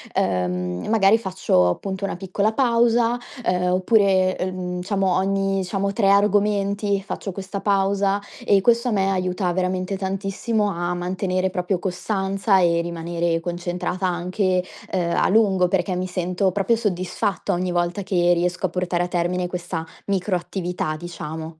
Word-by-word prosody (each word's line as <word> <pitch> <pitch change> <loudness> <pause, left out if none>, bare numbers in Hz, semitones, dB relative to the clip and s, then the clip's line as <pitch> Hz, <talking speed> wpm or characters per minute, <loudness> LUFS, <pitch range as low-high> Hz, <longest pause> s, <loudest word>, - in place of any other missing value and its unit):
uhm, 90 -1 -1
magari 215 -1 +5
faccio 185 - +1
appunto 190 - -4
una - - -3
piccola 200 +3 -1
pausa. 235 -1 +3 0.3
Uhm, 180 0 +1
oppure, 185 -1 +3
uhm, 180 -1 -3
diciamo 195 -1 0
ogni 195 0 +1
diciamo 195 +2 -2
tre 200 -1 +2
argomenti 200 0 +2
faccio 195 0 -5
questa 195 +1 -6
pausa, 200 0 +1 0.2
e 195 -1 +4
questo 235 +3 +3
a - - -1
me 195 -2 +1
aiuta 185 -1 0
veramente 185 +1 -1
tantissimo 195 +3 -1
a 175 -2 -2
mantenere 185 +1 -1
proprio 180 0 -1
costanza 195 +2 0
e 170 -2 +3
rimanere 170 0 -2
concentrata 175 +2 -3
anche, 180 +1 0 0.3
ehm, 175 -2 0
a - - +2
lungo 195 -3 +4
perché 185 0 0
mi 185 +1 -2
sento 180 +1 0
proprio 200 +5 +1
soddisfatta 195 -2 -1
ogni 180 +1 -1
volta 175 +2 -1
che 175 -2 +2
riesco 180 +2 0
a - - -10
portare 175 0 -1
a - - -2
termine 180 0 -1
questa 175 -2 -4 0.2
micro 195 -1 0
attività 175 -3 -3
diciamo. 160 -1 -7
185 Hz, 145 wpm, -22 LUFS, 175-200 Hz, 0.3 s, magari